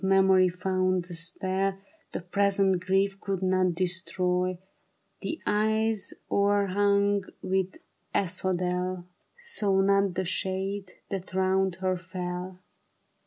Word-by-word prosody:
memory 190 -1 +5
found 185 0 0
a 180 - -7
spell 190 +3 -1 0.3
The - - -4
present 195 +1 +2
grief 195 +1 +1
could 195 -2 -2
not 185 -1 +2
destroy; 180 0 0 0.6
The 325 - -3
eyes 220 0 +1 0.2
o'erhung 200 0 +2 0.2
with 190 0 -1 0.3
asphodel, 180 -1 -1 0.4
Saw 205 - +3
not 195 -1 +3
the 185 - -1
shade 190 +1 -2 0.2
that 190 -1 -5
round 190 -1 +2
her 185 0 +2
fell. 180 0 -5
190 Hz, 105 wpm, -28 LUFS, 185-195 Hz, 0.6 s, memory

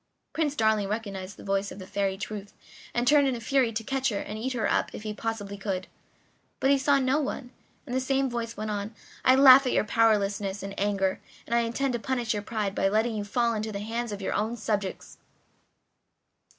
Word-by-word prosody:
Prince 300 -3 0
Darling 220 -4 +2
recognized 200 -3 -5
the - - -11
voice 195 0 -1
of - - -9
the 190 - -8
Fairy 195 0 -1
Truth 205 0 -6 0.4
and 240 +1 -1
turned 290 0 +6
in 260 - 0
a - - -5
fury 250 +1 +2
to 225 0 -3
catch 270 +2 0
her 205 - -2
and 210 - -5
eat 260 +3 -2
her 230 -3 0
up - - +1
if - - -8
he 215 -1 -3
possibly 210 -2 -4
could; 190 -2 -2 0.7
but 270 - +3
he 280 - +5
saw 285 0 +4
no 265 +2 +2
one, 270 -3 -4 0.3
and 250 - -6
the 260 - +2
same 270 +1 +1
voice 235 -3 -4
went 215 0 -3
on: 205 +2 -4 0.3
"I 255 - +6
laugh 265 0 +8
at - - +1
your - - +3
powerlessness 205 -3 +1
and 195 0 -5
anger, 195 -2 0 0.3
and - - -4
I 235 - +5
intend 235 +3 0
to 240 - -1
punish 245 -2 -1
your 205 - -2
pride 210 -2 -2
by 195 - +1
letting 220 +3 +1
you 210 - -2
fall 235 +3 +1
into 215 0 -3
the 200 - -4
hands 230 +2 -3
of 200 -1 -5
your - - -1
own 220 +3 -1
subjects." 205 -3 -3
220 Hz, 220 wpm, -27 LUFS, 205-250 Hz, 0.7 s, laugh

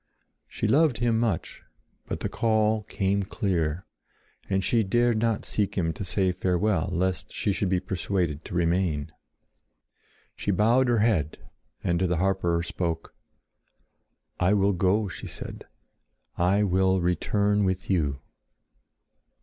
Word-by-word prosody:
She - - -2
loved 150 -4 +3
him 115 -1 +1
much; 110 -8 -2 0.5
but - - -4
the - - -1
call 110 -1 +1
came 100 -1 -1
clear, 90 -4 -1 0.6
and 95 -1 +1
she 115 +2 +2
dared 120 +3 +2
not 115 -1 0
seek 105 -1 -1
him 80 -3 0
to 80 - -6
say 95 0 +1
farewell, 90 0 0
lest 90 -1 -1
she 100 - -1
should 95 0 -1
be 95 -1 +2
persuaded 90 -4 -2
to 95 - -7
remain. 85 -4 0 1.2
She - - -5
bowed 115 +7 +3
her 120 -1 +3
head 80 -10 0 0.5
and 85 -1 +1
to 95 - +1
the 90 -1 0
harper 90 -2 +1
spoke: 85 -1 -3 1.3
"I 90 +3 +3
will 100 0 +3
go," 95 +4 +1
she 90 - -7
said. - - -7 0.7
"I 95 +4 +2
will 95 -1 +2
return 100 +4 +1
with 95 -1 -1
you." 75 -7 0
95 Hz, 135 wpm, -26 LUFS, 90-105 Hz, 1.3 s, loved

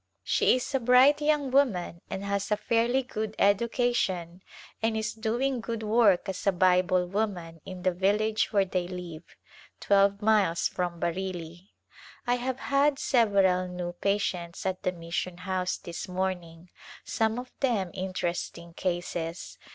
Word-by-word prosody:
She - - +3
is 255 +2 -4
a 270 - +2
bright 255 +4 +5
young 295 -3 +1
woman 200 -11 +1
and 195 - -4
has 200 0 -1
a 210 - +2
fairly 235 +4 +1
good 220 -4 -4
education 200 -5 +1 0.4
and 225 0 +1
is 220 -1 -2
doing 240 +3 -1
good 230 -1 -4
work 210 -4 +3
as 190 +1 -4
a - - +6
Bible 185 0 +3
woman 175 -4 -3
in 185 -1 -8
the 185 - +3
village 210 +4 +1
where 200 -3 +3
they 180 -1 -2
live, 175 -3 -8 0.4
twelve 200 0 +3
miles 210 -6 +3
from 175 -2 -3
Bareilly. 175 0 -4 0.6
I 245 0 +2
have 255 +1 -3
had 280 0 +2
several 195 -9 +3
new 180 -1 -5
patients 180 -2 -2
at 185 -1 -2
the 185 - 0
mission 175 +1 -4
house 185 0 -2
this 170 -1 -7
morning, 180 -2 -4 0.3
some 220 0 0
of 250 0 -6
them 215 -10 0
interesting 175 -2 -4
cases. 175 -1 -4
195 Hz, 145 wpm, -28 LUFS, 180-225 Hz, 0.6 s, a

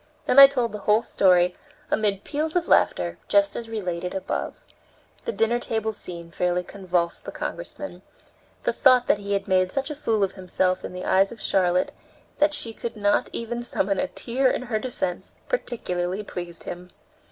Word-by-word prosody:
Then 270 - +5
I 275 - +13
told 250 -4 -1
the 210 - -6
whole 215 +2 +5
story, 180 -2 +3 0.4
amid 205 -2 +1
peals 310 +2 -2
of 350 -1 +1
laughter, - - +2
just 300 0 +3
as 230 -1 -5
related 180 -5 -3
above. 190 - -3 0.7
The 470 - -1
dinner 235 - +1
table 220 -2 -2
scene 170 -4 -8
fairly 180 +1 0
convulsed 180 -3 -2
the - - -6
Congressman. - - -6 0.6
The - - +1
thought 255 -3 +5
that 210 - +2
he 200 0 -3
had 200 0 -1
made 185 -1 +2
such 275 +2 -2
a - - -4
fool 225 -8 0
of 190 - +1
himself 185 -1 -1
in - - -5
the 180 0 -6
eyes 190 +1 +3
of 235 - -10
Charlotte 180 -3 +1 0.5
that 300 0 +4
she 230 -5 -1
could 230 0 -6
not 205 0 +2
even 235 +1 -4
summon 195 -5 -1
a 280 - +1
tear 260 0 0
in - - -1
her 220 -3 -1
defense, 190 -7 -3
particularly 190 - -2
pleased 175 -4 -7
him. 180 +1 -7
205 Hz, 180 wpm, -25 LUFS, 180-240 Hz, 0.7 s, I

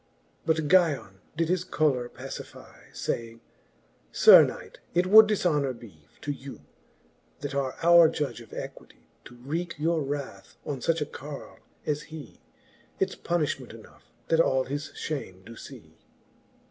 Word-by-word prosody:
But 160 -2 +1
Guyon 145 - +2 0.2
did 165 0 +1
his 180 +1 0
choler 145 -8 0
pacify, - - -10
Saying, 115 0 -4 0.7
Sir - - +9
knight^ - - -6 0.2
it 175 +1 +3
would 215 +3 +8
difhonour 150 - 0
bee 85 -11 -15
To 145 - -3
you, 140 -1 -9 0.8
that 145 -1 -4
are 135 -2 -1
our 170 -1 +7
judge 135 -7 -3
of 115 - -15
equity, - - -9 0.2
To 120 - -13
wreake 160 +8 -4
your 160 +2 +1
wrath 140 0 -6
on 140 -3 -4
fuch 165 +4 0
a - - +1
carle 145 0 -9 0.3
as 150 -1 -1
hee; 155 -2 -10 0.6
It's - - 0
punifhment 150 -8 -2
enough 110 - -16 0.2
that 165 - +3
all 130 -5 +3
his 145 +3 -4
fliame 95 -12 -6
doe 115 +2 -11
lee. - - -15
145 Hz, 145 wpm, -27 LUFS, 130-165 Hz, 0.8 s, Sir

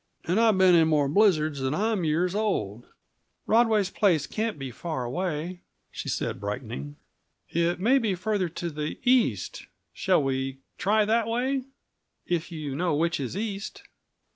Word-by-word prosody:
And 180 +6 +1
I've 225 -4 +4
been 185 -1 +6
in 165 -2 +5
more 150 -3 +3
blizzards 155 -4 +3
than 135 +2 -1
I'm 215 -1 0
years 165 +3 +1
old." 120 - -2 0.6
"Rodway's 220 -4 +3
place 175 -8 +2
can't 220 -4 -2
be 135 -2 -6
far 155 0 -4
away," 175 +4 -3 0.3
she - - -5
said, - - -2
brightening. 70 +2 -5 0.5
"It 170 +1 0
may 250 +8 +4
be 215 -6 0
farther 190 -1 -1
to 170 +1 -5
the 150 0 -4
east; 240 - +1 0.3
shall - - +2
we 135 0 -2 0.2
try 210 +2 +3
that 225 +1 +2
way 255 +3 -1 0.6
if 175 0 -2
you 150 -4 -5
know 170 0 0
which 165 +2 0
is 135 +6 -4
east?" 205 -1 -5
175 Hz, 155 wpm, -27 LUFS, 150-215 Hz, 0.6 s, been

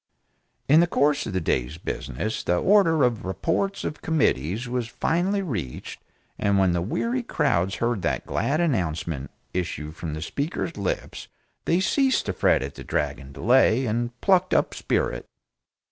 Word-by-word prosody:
In 150 +3 +6
the 170 - +4
course 145 -3 +2
of 105 - -5
the 95 - +1
day's 70 -3 -1
business 105 - -4
the 90 - +1
Order 165 - +4
of 120 -4 +1
"Reports 165 - -1
of 150 - -4
Committees" 115 - 0
was 120 -1 -2
finally 185 - 0
reached 100 - -5 0.4
and 100 -1 +2
when 95 -2 +4
the 85 0 0
weary 230 - -1
crowds 95 - 0
heard 115 -3 -1
that 70 -7 -1
glad 150 +3 0
announcement 85 - -1 0.2
issue 80 -4 -3
from 80 -1 -6
the 80 - -5
Speaker's 150 - -3
lips 100 -2 -4 0.4
they 170 - +2
ceased 265 +7 +2
to 95 - -2
fret 80 - +2
at 70 +1 -6
the - - -9
dragging 70 0 -2
delay, 125 - +3
and 120 +1 -2
plucked 185 -2 +3
up - - +2
spirit. - - -1
115 Hz, 160 wpm, -25 LUFS, -, 0.4 s, In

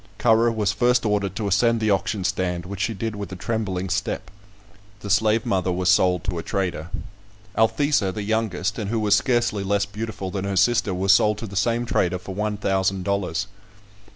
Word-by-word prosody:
Currer 115 0 +4
was 105 -3 0
first 120 +4 +2
ordered 100 -3 0
to 105 -1 -2
ascend 115 +4 +3
the 110 -1 +1
auction 95 +1 0
stand, 90 -1 -1
which 100 +1 -7
she 110 +3 -1
did 110 +2 -3
with 100 -1 -6
a - - -5
trembling 95 -2 -2
step. 100 0 -3 0.7
The 100 - -4
slave 110 +2 +3
mother 95 -1 0
was 90 0 0
sold 90 -3 +3
to 90 -4 -2
a - - -3
trader. 90 -2 -3 0.7
Althesa, 115 -2 +2
the 105 +2 -5
youngest, 105 -1 -1
and 105 -2 -3
who 115 0 0
was 105 -2 +2
scarcely 120 -3 +1
less 100 +1 +1
beautiful 105 -2 -5
than 95 0 -3
her 100 -1 -2
sister, 120 -1 +3
was 95 +1 +4
sold 105 +2 +3
to 115 - -6
the 100 -2 -9
same 120 +4 +1
trader 90 -6 +1
for 95 +2 -8
one 105 +1 -2
thousand 95 -1 0
dollars. 100 -2 -1
100 Hz, 195 wpm, -23 LUFS, 95-110 Hz, 0.7 s, Currer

